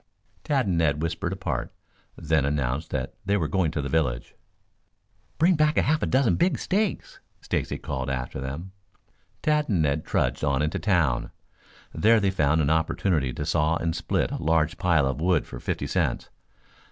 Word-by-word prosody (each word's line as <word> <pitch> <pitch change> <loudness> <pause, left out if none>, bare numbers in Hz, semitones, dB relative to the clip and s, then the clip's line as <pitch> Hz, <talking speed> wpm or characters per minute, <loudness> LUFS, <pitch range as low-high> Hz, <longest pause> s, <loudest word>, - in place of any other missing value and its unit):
Tad 135 -4 +1
and 90 -4 0
Ned 75 -1 +1
whispered 85 0 -2
apart, - - -3 0.4
then 80 -3 +1
announced 70 +1 -1
that - - -3
they 100 +1 +1
were 80 -6 0
going 85 +1 +1
to 75 -1 -3
the - - -2
village. 65 -4 -1 1.0
"Bring 170 +5 +4
back 155 -1 +2
half 155 +2 +2
a - - 0
dozen 130 -2 +2
big 180 +2 +2
steaks," 205 +1 -2 0.2
Stacy - - -2
called 65 -1 -4
after 65 0 -4
them. 70 +8 -6 0.7
Tad 150 -1 +1
and 90 -7 +2
Ned 75 +1 0
trudged 65 +4 -1
on 70 -1 +1
into 75 - -1
town. 80 - +1 0.6
There 115 +1 +4
they 100 -2 +1
found 80 -3 +2
an 70 0 +1
opportunity 80 -3 +1
to 75 - -4
saw 75 +1 +1
and 80 0 -1
split - - -1
a - - -4
large 80 0 +1
pile 85 -6 +3
of 65 +3 -2
wood 90 -2 +2
for - - -9
fifty - - -3
cents. - - -1
80 Hz, 175 wpm, -25 LUFS, 70-95 Hz, 1.0 s, Bring